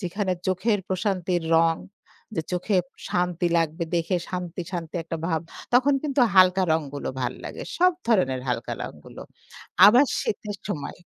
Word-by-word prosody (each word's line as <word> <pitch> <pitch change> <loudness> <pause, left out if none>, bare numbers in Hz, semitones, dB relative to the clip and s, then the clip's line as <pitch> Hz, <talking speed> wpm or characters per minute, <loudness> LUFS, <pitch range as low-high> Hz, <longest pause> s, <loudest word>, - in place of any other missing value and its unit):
যেখানে 190 +1 -2
চোখের 200 +3 +1
প্রশান্তির 185 -2 -1
রং, 165 0 +4 0.6
যে 160 - -1
চোখে 180 +3 0 0.3
শান্তি 175 -1 0
লাগবে 165 +1 -1
দেখে 170 +2 +1
শান্তি, 180 -1 -4
শান্তি 165 -3 -5
একটা 165 0 -5
ভাব 160 -2 0 0.3
তখন 265 +3 +5
কিন্তু 280 -3 0
হালকা 185 0 +6
রংগুলো 145 -3 -2
ভাল 125 0 -1
লাগে। - - -6
সব 365 +1 +4
ধরনের 135 - +2
হালকা 125 - -2
রংগুলো। - - -9 0.7
আবার 240 +7 +7 0.2
শীতের 205 0 -3
সময় 150 -8 -4
180 Hz, 140 wpm, -25 LUFS, 165-205 Hz, 0.7 s, আবার